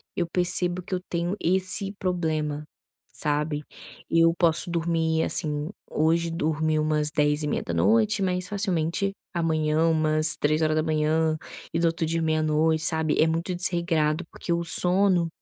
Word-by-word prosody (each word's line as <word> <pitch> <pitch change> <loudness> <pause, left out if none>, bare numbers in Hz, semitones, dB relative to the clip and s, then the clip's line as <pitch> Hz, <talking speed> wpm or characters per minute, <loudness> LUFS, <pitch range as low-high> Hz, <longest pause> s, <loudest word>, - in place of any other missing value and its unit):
eu 175 - 0
percebo 180 0 0
que 185 - -4
eu 180 - -4
tenho 175 +2 -1
esse 190 +2 +1
problema, 155 -5 -2 0.5
sabe. 150 0 -2 0.5
Eu 165 0 +4
posso 170 0 +4
dormir 165 -1 0
assim, 150 -1 -2 0.2
hoje 165 +2 +1
dormir 155 -1 0
umas 155 -1 0
22:30, 130 - +1
mas 180 -1 -1
facilmente 195 -2 -1 0.2
amanhã 160 -2 +1
umas 155 -1 +1
3h 155 +1 +1 0.4
e 165 - 0
do 170 - +3
outro 165 0 -1
dia 165 +1 -1
meia-noite 155 0 +1
sabe. 160 -2 0
É 160 - +4
muito 165 +3 -1
desregrado, 170 -3 0
porque 170 - -3
o 170 0 -1
sono, 180 0 +2
160 Hz, 130 wpm, -25 LUFS, 155-175 Hz, 0.5 s, Eu